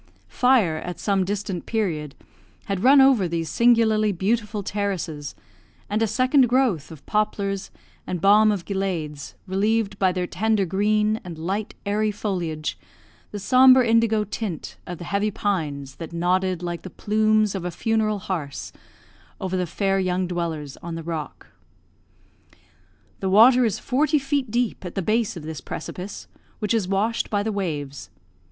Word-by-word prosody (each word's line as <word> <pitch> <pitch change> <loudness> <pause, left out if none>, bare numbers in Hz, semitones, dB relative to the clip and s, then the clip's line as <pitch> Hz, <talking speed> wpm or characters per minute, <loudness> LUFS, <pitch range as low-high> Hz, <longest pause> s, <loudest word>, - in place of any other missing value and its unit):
Fire, 240 -11 +3
at 175 +2 -6
some 195 -2 +1
distant 195 -2 -4
period, 165 -10 -2 0.5
had 195 -2 -3
run 275 +2 +7
over 260 -9 +5
these 165 -1 -3
singularly 225 -3 +4
beautiful 210 +2 -1
terraces, 185 -8 -3 0.6
and 210 +2 0
a 225 - +3
second 255 +3 +3
growth 245 - +1
of 155 -4 -12
poplars 200 -2 -1 0.4
and 180 - -2
balm 210 +4 +5
of 195 -4 -3
gileads, 175 -7 -3
relieved, 205 +2 0
by 190 -1 +3
their 180 0 -2
tender 210 +3 0
green 210 +4 +1
and 175 -3 -8
light, 195 +6 -3
airy 210 +2 +1
foilage, 175 -7 -3 0.5
the 210 - -6
sombre 255 +4 +6
indigo 225 -1 +3
tint 205 -4 -5
of 175 - -5
the 175 - -8
heavy 200 +4 0
pines 150 -10 -3
that 165 -1 -7
nodded 180 +1 0
like 175 -1 -4
the 185 - -8
plumes 215 +1 +1
of 190 -3 -4
a 180 - -2
funeral 215 +3 0
hearse 170 -7 -5 0.7
over 185 0 -3
the 180 -1 -1
fair 195 +3 0
young 185 0 0
dwellers 165 -5 -4
on 170 -1 -7
the 165 - -6
rock. 160 -2 -5 1.7
The 190 - -1
water 240 +5 +7
is 220 - 0
forty 300 +4 +1
feet 275 -2 -1
deep 240 -2 -1
at 180 - -7
the 195 - -1
base 215 -1 0
of 160 - -8
this 155 -2 -6
precipice, 180 +7 -7 0.3
which 210 0 -1
is 215 -5 +1
washed 205 +4 0
by 205 -1 0
the 220 - -1
waves. 150 -9 -4
200 Hz, 155 wpm, -23 LUFS, 175-220 Hz, 1.7 s, run